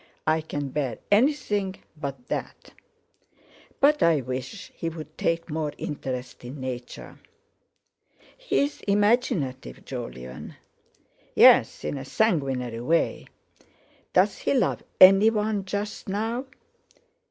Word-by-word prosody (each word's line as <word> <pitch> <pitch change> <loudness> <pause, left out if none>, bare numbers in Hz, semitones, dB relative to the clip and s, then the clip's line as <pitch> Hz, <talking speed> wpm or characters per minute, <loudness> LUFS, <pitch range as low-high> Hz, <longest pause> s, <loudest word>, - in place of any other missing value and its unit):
I 155 +1 +2
can 145 -2 -4
bear 135 -4 -2
anything 210 -5 +2 0.2
but 140 -4 -6
that. - - -5 1.1
But 295 +2 +4
I 165 -4 +4
wish 130 +1 -6
he'd 160 -2 -6
take 165 0 -1
more 155 -1 -2
interest 130 -4 -5
in 130 +4 -8
Nature." 125 -1 -7 1.2
"He's 400 - -1
imaginative, 200 - 0
Jolyon." 65 0 -7 0.8
"Yes, - - +6
in 140 - -3
a - - -6
sanguinary 135 - 0
way. 165 +7 0 0.8
Does - - +2
he - - 0
love - - +1 0.2
anyone 210 +1 +6
just 205 +1 -4
now?" 225 +6 -2
160 Hz, 100 wpm, -25 LUFS, 130-205 Hz, 1.2 s, Yes